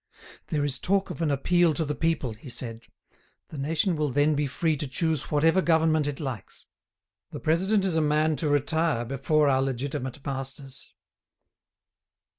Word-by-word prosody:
"There 150 -2 0
is 140 -2 -2
talk 195 +1 0
of - - -7
an 160 - +1
appeal 165 +4 +2
to 160 - -1
the 150 - -2
people," 160 -7 -1
he 115 +6 -12
said; 115 -1 -4 0.7
"the 155 - -8
nation 165 +5 0
will 150 -1 0
then 145 +4 +2
be 145 0 0
free 155 +4 0
to 145 0 -2
choose 160 +1 -1
whatever 160 +5 +3
government 160 -3 +3
it 145 -2 -4
likes. 130 - -6 0.6
The 150 -4 -7
president 190 +6 +2
is 175 -4 +1
a - - +3
man 155 +1 +2
to 150 +2 -1
retire 145 -2 +1
before 140 +4 +1
our 135 -1 +3
legitimate 135 0 -3
masters." 135 -1 -6
150 Hz, 165 wpm, -26 LUFS, 135-160 Hz, 0.7 s, whatever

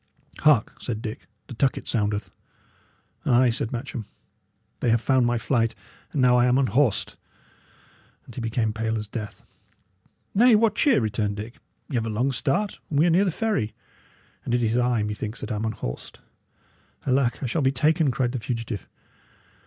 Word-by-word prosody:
"Hark!" - - +3
said 110 -3 -3
Dick, 110 - -6 0.2
"the - - -9
tucket 125 +3 0
soundeth." 105 -2 -1 0.9
"Ay," 125 0 +4
said 115 0 -2
Matcham, 120 -3 -5 0.7
"they 120 - +1
have 115 0 +4
found 130 0 +2
my 120 0 +1
flight, 115 -1 0 0.4
and 140 -5 +1
now 125 0 +5
I 120 0 +4
am 125 +1 +3
unhorsed!" 135 -3 +1 1.1
and 120 - -13
he 120 - -5
became 115 -1 0
pale 110 0 -1
as 105 -1 -4
death. 105 -2 -7 0.9
"Nay, 235 +3 +6
what 215 0 +3
cheer!" 265 +3 +4
returned 105 -1 -1
Dick. 110 +4 -7 0.3
"Y' - - -10
have 115 -2 0
a - - -2
long 120 +6 0
start, 140 - -1
and 145 - -1
we 155 - +5
are 175 - +4
near 185 +5 +4
the - - +2
ferry. 200 - -1 0.7
And 120 - 0
it 120 - +1
is 115 0 +1
I, 120 -3 +2
methinks, 105 +2 -4
that - - -5
am 110 +1 -2
unhorsed." 105 - -5 0.9
"Alack, 130 -1 +1
I - - 0
shall 150 +6 0
be 130 -1 +3
taken!" 155 +3 +2
cried 125 -1 0
the 130 - -3
fugitive. 115 -2 -4
120 Hz, 175 wpm, -25 LUFS, 110-135 Hz, 1.1 s, Nay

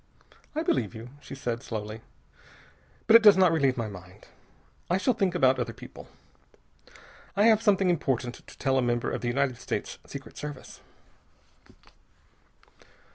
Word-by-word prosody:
"I 315 - -1
believe 120 - 0
you," 115 +2 -9
she 140 - -10
said 120 -3 -3
slowly, 110 -2 -6 1.0
"but 220 - +6
it 230 - +10
does 210 -3 +8
not 185 -3 +5
relieve 140 -5 +2
my 115 -2 -2
mind. 90 -3 -12 0.6
I 180 - +2
shall 250 +6 +1
think 195 -6 0
about 130 -6 +3
other 115 -2 -3
people. - - -12 1.3
I 205 - +3
have 220 -1 +5
something 195 -4 +3
important 130 -7 -1
to - - -14
tell 135 -1 +1
a - - +2
member 120 -1 0
of - - -3
the 120 - -3
United 130 0 0
States - - -4
Secret - - -10
Service." 145 -3 -8
135 Hz, 150 wpm, -27 LUFS, 120-185 Hz, 1.3 s, it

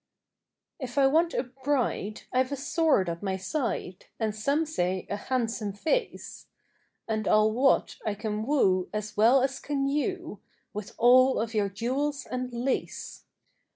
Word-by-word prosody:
If 255 -2 -6
I 275 - +5
want 325 +5 +3
a - - +1
bride, 255 -5 -2
I've 255 +1 +2
a - - 0
sword 290 - +2
at 170 0 -4
my 190 -2 -2
side, 190 -2 -3
And 220 -2 0
some 280 +9 0
say 185 - -1
a - - 0
handsome 225 -2 -2
face; 320 - -2 0.6
And 215 -2 -1
I'll 215 0 +4
wot 260 +5 +2
I 215 -2 -1
can 215 0 -3
woo 190 -11 +2
as 210 0 -4
well 240 +5 +5
as 270 0 -1
can 275 -1 -1
you, 300 - -2 0.3
With 210 -1 -7
all 255 +2 +6
of 225 +1 -2
your 205 -2 +1
jewels 265 +7 -2
and 255 0 -4
lace. 245 +3 -3
245 Hz, 155 wpm, -28 LUFS, 210-275 Hz, 0.6 s, all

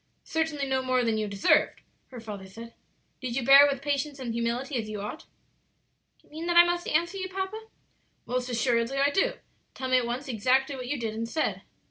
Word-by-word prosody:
"Certainly 320 -3 -1
no 265 -1 0
more 255 -1 +1
than 220 -1 +1
you 215 - -1
deserved," 200 -1 +2 0.3
her 250 - -10
father 205 -4 -8
said. 230 +4 -11 0.5
"Did 250 -2 -4
you 255 -2 -1
bear 275 +2 +9
it - - +1
with 275 - -5
patience 285 0 -1
and 250 -4 -4
humility, 235 +4 -2
as 220 -2 -4
you 210 -1 -5
ought?" 210 +10 -7 0.9
"Do - - -32
you - - -27
mean 320 +3 -6
that 345 0 +2
I 345 - +11
must 350 0 -1
answer 345 +5 0
you, 375 0 -4
papa?" 385 +4 -5 0.6
"Most 250 0 -2
assuredly 235 +1 0
I 280 +1 +3
do; 390 - +1 0.4
tell 260 -1 -4
me 255 0 +5
at 240 - -3
once 250 +4 -4
exactly 260 +4 +1
what 255 -2 -6
you 285 +1 -2
did 225 -2 -3
and 230 +1 -4
said." 315 +5 -1
260 Hz, 215 wpm, -27 LUFS, 235-295 Hz, 0.9 s, I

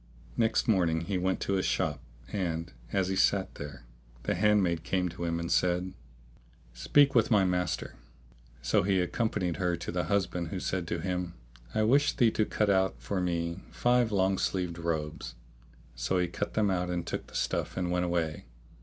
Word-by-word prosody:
Next 115 +2 +2
morning 85 -7 +2
he 95 +2 -2
went 95 +1 0
to 100 - -1
his 95 -1 +1
shop, 75 -7 0 0.3
and, 85 -5 -2 0.2
as 95 -2 +1
he 95 - 0
sat 95 0 +2
there, 70 -4 -8 0.4
the - - 0
handmaid 95 -5 +2
came 90 0 0
to 85 +1 -5
him 85 0 -1
and 85 0 -3
said, 90 +1 +1 0.8
"Speak 135 - +4
with 115 -4 +4
my 105 -4 +5
master." 90 -1 -1 0.7
So - - +3
he 95 0 +2
accompanied 90 -2 -1
her 90 -2 +1
to 85 - -5
the 90 -1 -1
husband 90 -2 0
who 95 +3 -4
said 90 -2 -2
to 85 -1 -2
him, 90 -1 -3 0.4
"I 110 - +3
wish 140 +6 +4
thee 120 -5 +4
to 110 - +1
cut 105 -1 +1
out 95 0 +1
for 100 -2 -2
me 85 0 -1
five 120 -2 +2
long 95 -1 +2
sleeved 90 -3 -1
robes."[FN#639] 80 -5 -3 0.6
So - - -1
he 90 -1 +2
cut 95 +4 -4
them 105 -2 +3
out[FN#640] 90 -1 0
and 85 -1 -2
took - - -4
the - - -14
stuff - - -1
and 90 -1 -1
went 90 0 +1
away. 85 -3 -1
90 Hz, 185 wpm, -30 LUFS, 85-100 Hz, 0.8 s, my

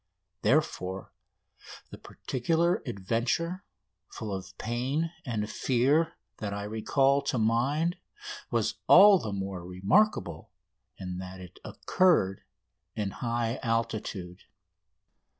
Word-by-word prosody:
Therefore 95 +1 0 0.8
the - - -10
particular 165 +7 0
adventure, 120 - -1 0.5
full 110 -3 -5
of 95 +1 -7
pain 130 +8 -1 0.2
and 110 -3 -2
fear, 135 +8 +1 0.2
that 100 -2 -4
I 100 - -4
recall 135 +6 +2
to 140 -2 -2
mind 135 +10 +1 0.5
was - - -1
all 200 -1 +9
the 110 - -4
more 95 -2 -4
remarkable 105 - +1 0.5
in 90 -1 -5
that 95 0 -8
it 90 -1 -12
occurred 160 - +2 0.5
in 105 -3 -2
high 120 0 -2
altitude. 110 -6 -3
115 Hz, 100 wpm, -29 LUFS, 95-140 Hz, 0.8 s, all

